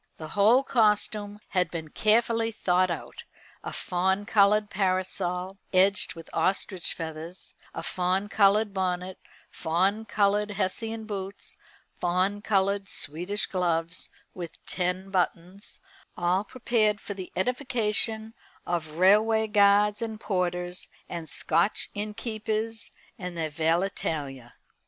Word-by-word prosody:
The 155 -1 -7
whole 220 +8 +5
costume 210 -3 +1
had 180 -3 +1
been 160 -2 -6
carefully 225 +4 +2
thought 185 -3 +2
out, 170 - -5 0.4
a - - -5
fawn 190 +3 0
coloured 210 -1 +4
parasol, 185 -1 -1
edged 190 0 +3
with 165 - -10
ostrich 185 +1 0
feathers, 165 +2 -7 0.2
a - - -4
fawn 185 +2 0
coloured 205 0 +3
bonnet, 185 -1 -2 0.3
fawn 190 +7 0
coloured 205 0 +2
Hessian 220 +3 -2
boots, 200 -2 -5 0.4
fawn 185 +4 0
coloured 200 -1 +1
Swedish 175 +8 -2
gloves 175 -1 -1 0.2
with 170 -3 -8
ten 185 +1 -2
buttons 185 +1 -2 0.4
all 180 +3 +2
prepared 225 -4 +1
for 205 - -6
the 190 -2 -8
edification 225 -1 +1 0.3
of 160 -3 -2
railway 215 +4 +5
guards 205 0 +4
and 220 -2 -4
porters, 180 -3 -1 0.2
and 170 -2 -5
Scotch 170 +6 +1
innkeepers 215 +1 -3 0.3
and 180 -2 -5
their 160 -2 -2
valetaille. 160 -5 -1
195 Hz, 115 wpm, -27 LUFS, 180-210 Hz, 0.4 s, whole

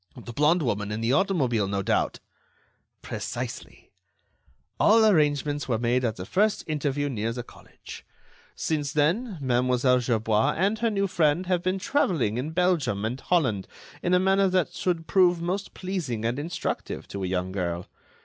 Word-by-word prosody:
"The 120 0 -9
blonde 155 +6 +3
woman 105 -4 -1
in 105 - -3
the 115 +3 +1
automobile, 140 - +1
no 100 0 -2
doubt." - - 0 0.8
"Precisely. - - -6 0.9
All 220 +1 +6
arrangements 145 -6 +2
were 115 - +2
made 120 +2 +1
at 115 -3 0
the 90 - -7
first 205 - +1
interview 145 -2 -1
near 115 -4 -2
the 120 0 -5
college. - - -13 0.5
Since 145 -3 -2
then, 180 +8 +1
Mlle. 125 -1 +1 0.2
Gerbois 110 -3 +1
and 200 +5 +1
her 230 -1 +2
new 200 -2 0
friend 170 -2 +1
have 180 -1 +1
been 185 +1 0
travelling 180 - 0
in 140 +5 -3
Belgium 160 - +1
and 120 +4 -3
Holland 130 - +1 0.3
in 180 - +2
a - - +4
manner 195 +1 +3
that 185 -2 +1
should 170 -3 -1
prove 180 -2 +3
most 185 +4 -3
pleasing 165 - -3
and 120 +4 -1
instructive 165 +4 -4
to 100 -1 -5
a - - -1
young 90 0 -2
girl. 90 -2 -3
145 Hz, 160 wpm, -26 LUFS, 115-180 Hz, 0.9 s, All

